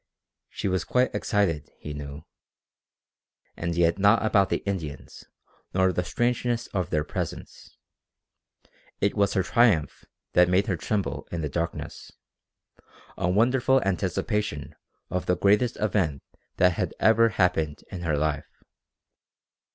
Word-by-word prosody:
She - - -4
was 95 -2 0
quite 125 +5 +1
excited, 90 - 0
he 75 - -7
knew. 75 +1 -7 1.3
And 85 0 -3
yet 85 +2 +2
not 105 +3 +4
about 100 -3 +3
the - - -1
Indians, 85 -8 -5 0.5
nor 95 0 +3
the 90 - 0
strangeness 120 +2 0
of 90 -5 -1
their 75 -1 0
presence. - - -6 1.2
It 100 - +1
was 100 -1 +1
her 95 - +2
triumph 105 -8 +2 0.3
that 90 0 +5
made 95 +2 +3
her 95 - 0
tremble 100 +4 -3
in 85 - -3
the 75 - -2
darkness, 85 +3 -4 1.0
a 90 - -1
wonderful 125 +6 +3
anticipation 95 -2 -2 0.4
of 90 +1 -2
the 90 - +2
greatest 105 +6 +3
event 90 -9 0 0.3
that 90 0 +5
had 85 - -3
ever 115 +1 +5
happened 80 -7 0
in 90 -3 -6
her 80 -4 0
life. 75 -1 -1
95 Hz, 130 wpm, -26 LUFS, 85-105 Hz, 1.3 s, that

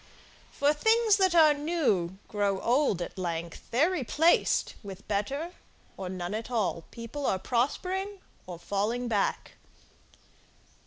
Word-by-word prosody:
For 285 +1 +2
things 445 +5 +3
that 375 -3 +3
are 310 -3 +7
new 285 - 0
grow 200 -2 0
old 240 - +2
at 185 - -8
length, 170 -2 -4
They're 295 +10 +3
replaced 325 +1 +2
with 195 -3 -10
better 275 - -2 0.4
or 185 -2 -5
none 180 0 -4
at 220 +2 -4
all: 210 -8 -1
People 235 +5 -5
are 190 - +2
prospering 365 - -1 0.3
or 180 -2 -7
falling 210 +7 -2
back. 210 -4 -1
235 Hz, 125 wpm, -28 LUFS, 195-315 Hz, 0.4 s, are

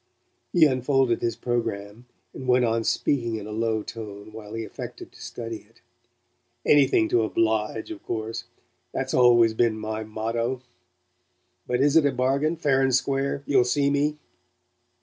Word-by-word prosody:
He 170 -3 +6
unfolded 130 -3 +2
his 115 - -1
programme, 115 -1 -3 0.3
and 130 - -8
went 125 0 +4
on 115 0 0
speaking 120 -2 0
in 105 -2 -5
a 105 - -7
low 110 0 -1
tone 105 -1 -8
while 110 0 -8
he 115 - -3
affected - - -9
to - - -16
study 115 -1 -6
it. - - -27 0.9
"Anything 135 -6 +4
to 120 - +3
oblige, 110 - 0
of 320 -1 -8
course. 115 +1 -4 0.5
That's 130 0 -2
always 120 -2 +5
been 110 -1 +1
my 110 0 -4
motto. 115 +4 -3 1.0
But 125 +1 0
is 145 +2 +3
it 160 -3 +6
a - - +1
bargain 135 +5 +1
fair 140 -5 +2
and 130 -2 +3
square? 140 +1 0
You'll 140 -3 +4
see 140 +3 +1
me?" 145 +1 +1
120 Hz, 155 wpm, -25 LUFS, 110-135 Hz, 1.0 s, He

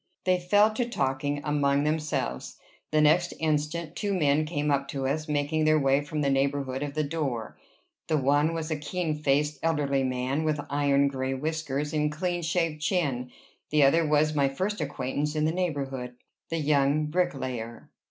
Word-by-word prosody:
They 185 -1 +2
fell 205 +4 +4
to 240 +2 -1
talking 145 - -1
among 145 -1 +1
themselves. 150 - -2 0.3
The 155 0 +3
next 165 +4 +3
instant, 155 +1 -1
two 200 -2 -1
men 150 -2 +2
came 150 -2 -1
up 140 0 +1
to 135 -1 -3
us, 155 +4 -1
making 150 +2 0
their 155 0 +5
way 135 -1 +3
from 150 +1 -4
the 140 - +1
neighborhood 135 -1 0
of 145 0 -4
the 155 - +1
door. 140 -7 -3 0.5
The 155 -1 +2
one 145 +4 +2
was 160 0 -4
a - - +1
keen 160 +2 -2
faced, 150 +1 +1
elderly 145 -4 +1
man, 130 +3 -1
with 155 -1 0
iron 140 -1 +3
gray 135 -1 -2
whiskers 150 0 -3
and 150 -1 +1
clean 175 +3 -2
shaved 165 -2 -1
chin; 140 -8 0 0.4
the 150 -1 +4
other 160 +5 +5
was 150 0 +2
my 140 -2 +2
first 190 +10 -2
acquaintance 145 +3 -2
in 155 0 +1
the 160 - +2
neighborhood, 135 -8 -3 0.3
the 165 - -1
young 145 0 +2
bricklayer. 130 -9 -3
150 Hz, 170 wpm, -27 LUFS, 140-160 Hz, 0.5 s, their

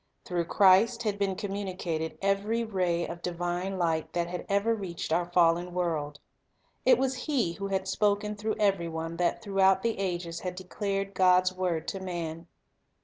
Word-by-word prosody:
Through 175 -2 -1
Christ 205 +7 +4
had 205 -2 -1
been 195 -1 0
communicated 185 -5 -3
every 205 +4 +1
ray 180 -5 0
of 170 0 -7
divine 175 +2 -2
light 165 -3 0
that 175 -1 0
had 175 +1 -6
ever 200 +3 +2
reached 180 -7 -4
our 175 +1 0
fallen 175 0 +3
world. 155 -5 -2 0.7
It 255 -2 +7
was 265 0 +1
He 245 - +1
who 200 +3 -4
had 190 -1 -1
spoken 210 +1 +1
through 215 +1 -2
every 195 -5 +1
one 165 +1 -4
that 175 +5 0
throughout 195 -2 +3
the 230 -3 -1
ages 175 -3 -2
had 180 -1 -4
declared 195 +1 -3
God's 185 0 +4
word 180 -4 -2
to 195 - -4
man. 170 -3 -5
185 Hz, 165 wpm, -29 LUFS, 170-200 Hz, 0.7 s, It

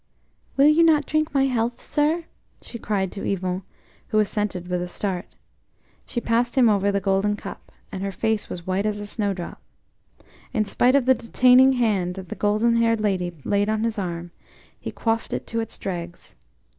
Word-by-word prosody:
"Will 275 - +6
you 305 +2 +5
not 315 -3 +4
drink 310 0 0
my 275 -1 +3
health, 240 -2 -1
sir?" 310 +3 0 0.4
she 235 - -9
cried 195 -4 -1
to 200 - -7
Yvon, 185 -1 -1 0.5
who 215 - 0
assented 205 -3 0
with 180 -1 -1
a 180 - -3
start. 185 0 -3 0.8
She 240 - -2
passed 235 +1 0
him 245 -3 +6
over 200 -1 +2
the 200 - +1
golden 195 +1 +1
cup, - - -10 0.2
and 190 - -5
her 195 0 -2
face 220 +2 -1
was 175 -1 -7
white 190 +3 0
as 210 -1 -1
a 205 - -5
snowdrop. 200 -4 -3 0.9
In 215 -4 +1
spite 245 +5 +3
of 275 -3 +3
the 260 - +6
detaining 250 +2 +5
hand 205 -8 0
that 190 -1 -8
the 215 - -5
golden 215 +4 +2
haired 230 -1 +2
lady 190 -4 0
laid 205 +1 +1
on 220 0 0
his 230 -2 -1
arm, 175 -2 -4 0.5
he - - -6
quaffed 225 0 -1
it - - -3
to 230 - -3
its 225 - -4
dregs. 175 -2 -6
210 Hz, 185 wpm, -24 LUFS, 190-240 Hz, 0.9 s, Will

